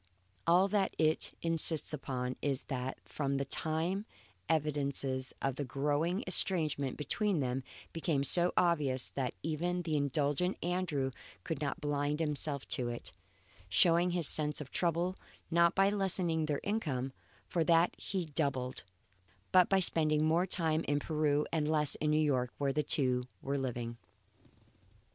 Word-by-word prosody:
All 180 +3 +5
that 200 -1 0
it 155 0 +2
insists 165 -2 +1
upon 130 -3 -3
is 140 -2 -1
that 130 -1 -4
from 140 -2 -2
this 140 -1 -2
time 170 +7 -1 0.4
evidences 140 -4 0
of 135 0 -1
a - - 0
growing 145 - -1
estrangement 155 -7 +3
between 185 +5 0
them 130 -1 -2 0.3
became 160 -4 0
so 175 +5 +4
obvious 150 -7 +3
that 130 -3 -3
even 175 +3 -2
the 160 -2 -1
indulgent 145 +5 0
Andrew 170 -7 -1 0.3
could 155 -3 -4
not 145 -2 -3
blind 145 0 -1
himself 150 -2 -2
to 120 -2 0
it; 120 0 -6 0.6
showing 170 - +4
his 175 -3 +1
sense 150 0 +2
of 145 -3 -8
trouble, 175 +2 0 0.3
not 170 0 +4
by 195 +1 +4
lessening 180 -5 0
their 145 -2 -1
income, 140 - -2 0.3
for 170 - 0
that 170 +1 +3
he 185 -3 -4
doubled, 140 -4 -1 0.7
but 185 -1 +5
by 195 - +4
spending 155 -4 +2
more 170 +4 +2
time 165 -3 0
in 145 - +1
Peru 150 -1 0
and 155 -2 0
less 150 -2 +2
in 150 - 0
New 150 - +3
York 130 -5 +1
where 140 -1 0
the 150 - +1
two 130 -4 +1 0.2
were 140 +1 -2
living. 120 -2 -4
150 Hz, 150 wpm, -33 LUFS, 140-170 Hz, 0.7 s, All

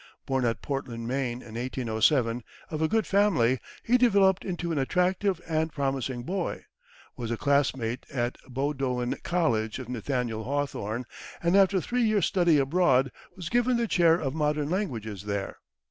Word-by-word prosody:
Born 130 -2 0
at 115 -1 -1
Portland, 120 -5 -4
Maine, 125 -1 -2
in 110 - -11
1807, 120 0 +1 0.3
of 155 -1 -3
a 160 - +3
good 220 +4 +1
family, 160 - +3 0.2
he 250 +2 +3
developed 200 -6 +4
into 175 -2 -3
an 155 - 0
attractive 180 +5 +1
and 160 0 0
promising 135 -3 -2
boy; 190 +9 -3 0.5
was 120 -3 -5
a 115 - -1
classmate 135 -4 0
at 120 -2 -1
Bowdoin 130 -2 -1
College 120 -11 0
of 130 -2 -8
Nathaniel 125 -2 -2
Hawthorne, 125 -4 -2 0.4
and 170 +2 +3
after 195 -1 +5
three 245 +7 -1
years' 215 -3 +3
study 175 -5 +3
abroad, 135 -3 +3 0.2
was 175 -3 -6
given 245 +2 +2
the 235 -1 0
chair 170 -5 +4
of 140 -6 -2
modern 150 -1 0
languages 115 - -3
there. 100 -1 -3
140 Hz, 155 wpm, -27 LUFS, 120-180 Hz, 0.5 s, after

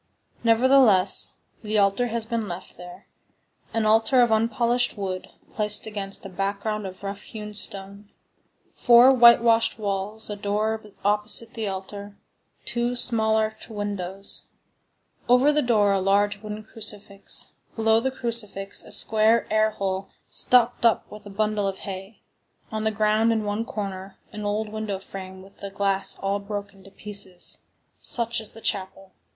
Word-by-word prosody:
Nevertheless, 230 -4 +4 0.3
the 215 0 -1
altar 200 +4 +2
has 230 -1 -3
been 230 -2 -2
left 180 +1 -8
there—an 180 +5 -9
altar 225 +4 +4
of 235 - +1
unpolished 235 +2 +1
wood, 190 -2 -4 0.2
placed 210 -1 -1
against 200 -3 -5
a - - -4
background 200 +2 -3
of 185 +1 -11
roughhewn 210 +2 -7
stone. 200 -1 -4 0.6
Four 245 +2 +6
whitewashed 235 -2 +5
walls, 205 +1 -3
a 210 - -4
door 215 +2 -1 0.2
opposite 210 +2 +2
the 225 -2 -3
altar, 200 +1 -7 0.5
two 240 +1 -1
small 220 -3 +3
arched 220 0 -2
windows; 200 -2 -3 0.8
over 250 +4 +5
the 300 - +2
door 215 -5 +3
a 195 - +1
large 200 +1 +1
wooden 215 0 -7
crucifix, 210 -2 -3 0.2
below 225 0 +3
the 260 +3 -1
crucifix 225 -6 -4
a - - -12
square 220 +1 +3
air 215 0 +4
hole 195 -2 -3 0.2
stopped 245 -1 +2
up 230 -2 +3
with 210 0 -11
a - - -9
bundle 210 0 -1
of 195 -1 -3
hay; 195 +2 -8 0.5
on 215 0 -3
the - - +3
ground, 215 +1 +2
in 220 -1 0
one 205 +2 -2
corner, 195 -3 -6
an 210 -1 -6
old 210 +1 -1
window 215 -2 -4
frame 190 -1 -9
with 195 +1 -18
the 200 - -7
glass 195 0 +1
all 195 +1 -1
broken 200 -1 -7
to 195 - -14
pieces—such 205 +4 -2
is 220 - -2
the 225 - -12
chapel. 190 -1 -3
210 Hz, 145 wpm, -24 LUFS, 195-225 Hz, 0.8 s, Four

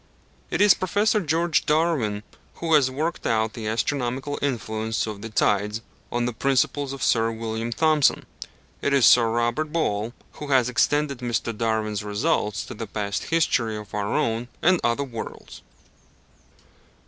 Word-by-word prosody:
It - - -1
is 205 -2 +8
Prof. 205 0 0
George 165 +1 +1
Darwin 150 -10 +1 0.3
who 165 -1 -1
has 145 -4 +5
worked 155 +6 -3
out 110 0 +1
the 110 -2 -6
astronomical 130 +4 -2
influence 110 -4 -2
of 105 -2 -6
the 115 - -6
tides, 105 0 +1 0.3
on 120 0 0
the 125 - -2
principles 135 +2 0
of 135 -1 -5
Sir 115 -1 +2
William 115 +1 -4
Thomson: 155 +2 +2 0.6
it 140 - 0
is 135 -3 +5
Sir 115 -2 +6
Robert 120 +7 0
Ball 115 -9 -1 0.2
who 150 - -8
has 130 -3 +3
extended 140 +2 +1
Mr. 120 -2 -2
Darwin's 110 -2 -1
results 105 +1 -1
to - - -8
the 115 0 -6
past 100 -2 -3
history 120 -9 +1
of 105 -1 -10
our 105 0 -2
own 115 +1 0 0.2
and 180 0 +4
other 120 +4 +1
worlds. 120 -5 -8
120 Hz, 150 wpm, -24 LUFS, 110-145 Hz, 0.6 s, is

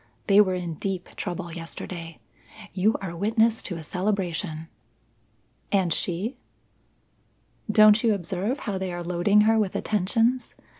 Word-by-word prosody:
They 200 +1 +6
were 185 -3 +1
in 175 -3 -5
deep 190 -2 -3
trouble 175 -3 -5
yesterday. 165 0 -6 0.6
You 200 +4 +2
are 170 -3 -5
witness 220 +4 +2
to 175 - -5
a 165 - -7
celebration." 180 -3 -2 1.0
"And 185 -5 +2
she?" 195 +8 -2 1.3
"Don't 215 +1 +7
you 225 -3 +3
observe 195 - -3
how 195 -2 -3
they 190 -1 -3
are 175 0 -5
loading 180 +4 +3
her 220 +1 +4
with 200 -4 -1
attentions? 225 +5 0
190 Hz, 135 wpm, -25 LUFS, 175-215 Hz, 1.3 s, Don't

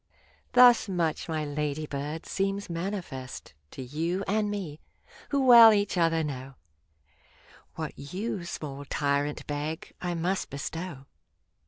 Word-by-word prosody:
Thus 245 -3 +7
much, 170 -3 -1
my 155 -1 -1
lady 150 +1 -2
bird, 145 +3 -5
seems 195 -1 -2
manifest 165 -7 -5 0.2
To 130 - -8
you 165 +8 -2
and 210 +1 +1
me, 185 -8 -5 0.5
who 280 -2 +1
well 235 -3 +10
each 205 -2 +1
other 165 -2 +2
know; 135 -2 -6 1.2
What - - -4
you, 185 +6 -4
small 145 -4 -6
tyrant, 145 +1 -1
beg, 150 +2 -4
I 175 -1 -2
must 180 +3 -1
bestow. 140 +1 -6
165 Hz, 125 wpm, -28 LUFS, 145-195 Hz, 1.2 s, well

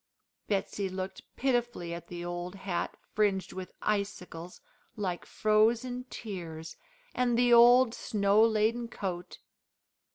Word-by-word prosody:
Betsey 200 -1 -1
looked 185 +1 -5
pitifully 240 -9 0
at 170 0 -7
the 175 0 -6
old 175 +1 -4
hat 190 -3 -3 0.2
fringed 195 -3 +1
with 185 -1 -7
icicles, 180 -4 -3 0.4
like 185 -4 -3
frozen 230 +4 +2
tears, 165 -6 -7 0.4
and 245 -2 +1
the 245 0 +5
old 240 +1 +7
snow 205 -3 +2
laden 225 +2 +2
coat. 180 -5 -5
200 Hz, 110 wpm, -30 LUFS, 180-235 Hz, 0.4 s, old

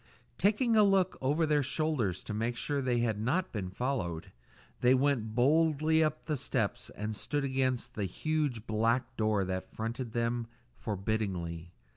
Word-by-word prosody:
Taking 220 +4 +3
a 215 - +7
look 195 -2 +3
over 145 +5 +2
their 150 -1 +3
shoulders 135 - -1
to - - -5
make 115 +3 -1
sure 145 +3 -1
they 125 -2 +1
had 110 -3 0
not 150 +12 0
been 100 -5 -3
followed, 95 -7 -3 0.5
they 125 +2 +5
went 130 -5 +1
boldly 155 +4 +3
up 155 0 -1
the 150 -3 -1
steps 120 -5 -2
and 105 +1 -3
stood 145 +7 -2
against 130 -2 0
the 105 - -2
huge 145 - -1
black 115 +3 0
door 110 -3 +1
that 95 0 -4
fronted 115 +1 -4
them 115 0 -1 0.3
forbiddingly. 95 -5 -3
120 Hz, 155 wpm, -31 LUFS, 110-150 Hz, 0.5 s, a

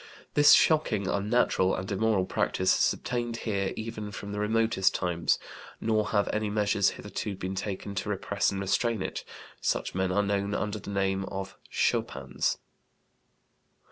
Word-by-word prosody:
This 145 0 +7
shocking, 125 - +4
unnatural, 100 -2 +2
and 95 +2 -5
immoral 100 -1 +2
practice 95 0 +1
has - - +4
obtained 120 -1 -3
here 100 -3 0
even 110 -1 -5
from 100 -1 -7
the 105 - -3
remotest 110 -2 +2
times; 85 -2 +1 0.4
nor 110 -2 +1
have 105 -1 +1
any 110 0 0
measures 105 -1 +2
hitherto 105 0 -4
been 95 0 -4
taken 100 0 -4
to 100 - -3
repress 100 0 0
and 100 - -3
restrain 110 +2 +1
it; - - -4 0.4
such - - -1
men 95 0 0
are 100 +2 +2
known 100 0 0
under 105 0 -2
the 100 - -9
name 95 -1 0
of 95 0 -6
schopans." 65 -2 0
100 Hz, 150 wpm, -28 LUFS, 95-110 Hz, 0.4 s, This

